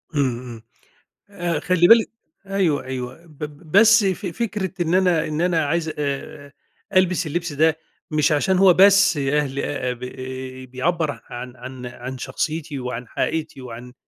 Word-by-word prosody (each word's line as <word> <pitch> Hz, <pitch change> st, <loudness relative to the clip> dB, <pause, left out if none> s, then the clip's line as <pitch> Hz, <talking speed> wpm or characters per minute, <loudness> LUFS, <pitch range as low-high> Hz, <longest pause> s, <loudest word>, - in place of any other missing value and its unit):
امم، 145 Hz, -, +3 dB, 0.2 s
امم، 120 Hz, -3 st, -9 dB, 0.7 s
آآ 175 Hz, -5 st, -2 dB
خلّي 175 Hz, +1 st, +3 dB
بالِك 230 Hz, +1 st, +6 dB, 0.4 s
أيوه 195 Hz, -7 st, 0 dB
أيوه، 130 Hz, +4 st, -6 dB
ب 155 Hz, -3 st, -19 dB
ب 150 Hz, +2 st, -9 dB
بس 225 Hz, +1 st, +7 dB
ف 190 Hz, +2 st, -1 dB
فكرة 195 Hz, 0 st, -3 dB
إن 170 Hz, 0 st, 0 dB
أنا 180 Hz, -4 st, +3 dB
إن 155 Hz, +1 st, -2 dB
أنا 170 Hz, -3 st, +2 dB
عايز 160 Hz, +1 st, -1 dB
آآ 145 Hz, 0 st, -4 dB, 0.4 s
ألبس 185 Hz, -2 st, +3 dB
اللبس 170 Hz, +1 st, -3 dB
ده، 160 Hz, +2 st, +3 dB, 0.3 s
مش 150 Hz, -1 st, +2 dB
عشان 170 Hz, +5 st, +2 dB
هو 190 Hz, -1 st, +7 dB
بس 195 Hz, -2 st, +6 dB
أهل 140 Hz, 0 st, 0 dB
آآ 125 Hz, -3 st, -2 dB
ب 120 Hz, -, -15 dB, 0.7 s
بيعبر 155 Hz, +3 st, -1 dB
عن 125 Hz, +1 st, -7 dB
عن 125 Hz, 0 st, -9 dB
عن 125 Hz, +1 st, -7 dB
شخصيتي 155 Hz, +1 st, -3 dB
وعن 125 Hz, -1 st, -5 dB
حقيقتي 155 Hz, +1 st, -3 dB
وعن 125 Hz, 0 st, -9 dB
155 Hz, 155 wpm, -22 LUFS, 135-180 Hz, 0.7 s, بس